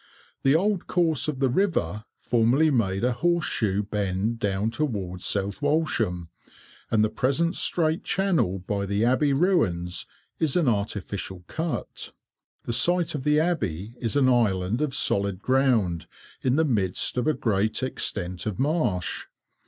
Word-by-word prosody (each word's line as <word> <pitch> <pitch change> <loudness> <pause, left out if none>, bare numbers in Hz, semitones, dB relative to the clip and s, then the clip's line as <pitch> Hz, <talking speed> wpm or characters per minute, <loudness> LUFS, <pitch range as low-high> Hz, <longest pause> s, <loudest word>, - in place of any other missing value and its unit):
The 135 +2 +4
old 195 +2 +1
course 165 -6 +1
of 150 -3 -2
the 135 0 +2
river 120 - 0
formerly 125 +7 +2
made 100 -6 0
a 125 - +3
horse 170 +7 +1
shoe 105 -2 0
bend 105 +2 -2
down 100 +1 0
towards 100 -10 -3
South 100 +4 0
Walsham, 115 - 0 0.6
and 110 -1 +3
the - - +4
present 140 +9 +1
straight 160 -1 0
channel 180 - +1
by 100 +2 -3
the 100 +3 +1
Abbey 130 +4 +2
ruins 95 - +1 0.3
is 155 -4 +1
an 175 -5 +2
artificial 100 -4 -2
cut. 160 - -3 0.5
The 120 - -3
site 175 +7 +3
of 145 -4 -4
the 150 +1 +3
Abbey 110 - -1
is 115 +1 -1
an 140 -2 +4
island 110 -2 +1
of 150 -3 -1
solid 100 -2 0
ground 115 - +1 0.3
in 130 0 +1
the 160 +2 +3
midst 100 - +1
of 125 +2 0
a 155 - +2
great 110 +2 0
extent 90 -7 -3
of 105 - -3
marsh. 130 - -1
120 Hz, 150 wpm, -25 LUFS, 100-150 Hz, 0.6 s, The